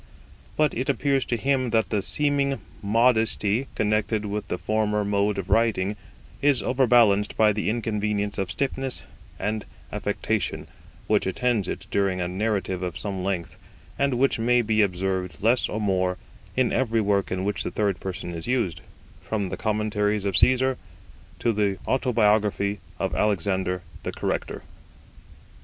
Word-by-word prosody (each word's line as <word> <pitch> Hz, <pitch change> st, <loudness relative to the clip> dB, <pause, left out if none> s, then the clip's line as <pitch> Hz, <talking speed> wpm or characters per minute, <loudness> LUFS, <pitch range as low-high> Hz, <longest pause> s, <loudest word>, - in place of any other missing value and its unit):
But 155 Hz, -1 st, +3 dB
it 130 Hz, +4 st, -2 dB
appears 140 Hz, 0 st, +1 dB
to 120 Hz, -, -1 dB
him 130 Hz, 0 st, +1 dB
that 115 Hz, -1 st, +1 dB
the 105 Hz, -2 st, +1 dB
seeming 140 Hz, +3 st, +1 dB, 0.2 s
modesty 115 Hz, +1 st, +2 dB
connected 110 Hz, 0 st, 0 dB
with 105 Hz, +1 st, -3 dB
the -, -, -2 dB
former 105 Hz, 0 st, 0 dB
mode 100 Hz, 0 st, +1 dB
of 95 Hz, -2 st, -4 dB
writing 105 Hz, -3 st, +2 dB, 0.5 s
is 140 Hz, -2 st, +3 dB
overbalanced 120 Hz, -6 st, +3 dB
by 110 Hz, -1 st, +5 dB
the 105 Hz, 0 st, -1 dB
inconvenience 105 Hz, -2 st, -1 dB
of 95 Hz, -2 st, -1 dB
stiffness 135 Hz, +4 st, 0 dB, 0.3 s
and 105 Hz, 0 st, -2 dB, 0.3 s
affectation -, -, -2 dB, 0.4 s
which -, -, +2 dB
attends 110 Hz, +1 st, 0 dB
it -, -, -5 dB
during 95 Hz, -2 st, +1 dB
a 90 Hz, -, -1 dB
narrative 95 Hz, -1 st, -1 dB
of 90 Hz, -6 st, -3 dB
some 95 Hz, +4 st, -4 dB
length, 90 Hz, -2 st, -3 dB, 0.4 s
and 140 Hz, -2 st, +2 dB
which 130 Hz, -1 st, +2 dB
may 120 Hz, +1 st, +3 dB
be 110 Hz, 0 st, +2 dB
observed 95 Hz, -1 st, -1 dB
less 120 Hz, +3 st, +3 dB
or 110 Hz, -, -3 dB
more 95 Hz, -3 st, 0 dB, 0.4 s
in 130 Hz, -2 st, +2 dB
every 115 Hz, -3 st, +1 dB
work 100 Hz, -2 st, +1 dB
in 95 Hz, 0 st, -1 dB
which 100 Hz, -2 st, -1 dB
the -, -, -2 dB
third 100 Hz, -3 st, 0 dB
person 95 Hz, -2 st, -5 dB
is 85 Hz, +4 st, -6 dB
used, 120 Hz, -10 st, 0 dB, 0.4 s
from 100 Hz, -4 st, -2 dB
the -, -, -3 dB
Commentaries 105 Hz, -1 st, 0 dB
of 100 Hz, -2 st, 0 dB
Caesar 130 Hz, +4 st, +3 dB, 0.6 s
to 115 Hz, -, +1 dB
the 100 Hz, -2 st, +1 dB
Autobiography 105 Hz, -5 st, +2 dB, 0.2 s
of -, -, -2 dB
Alexander 95 Hz, -2 st, 0 dB, 0.2 s
the -, -, -4 dB
Corrector. -, -, -3 dB
105 Hz, 150 wpm, -25 LUFS, 100-120 Hz, 0.6 s, by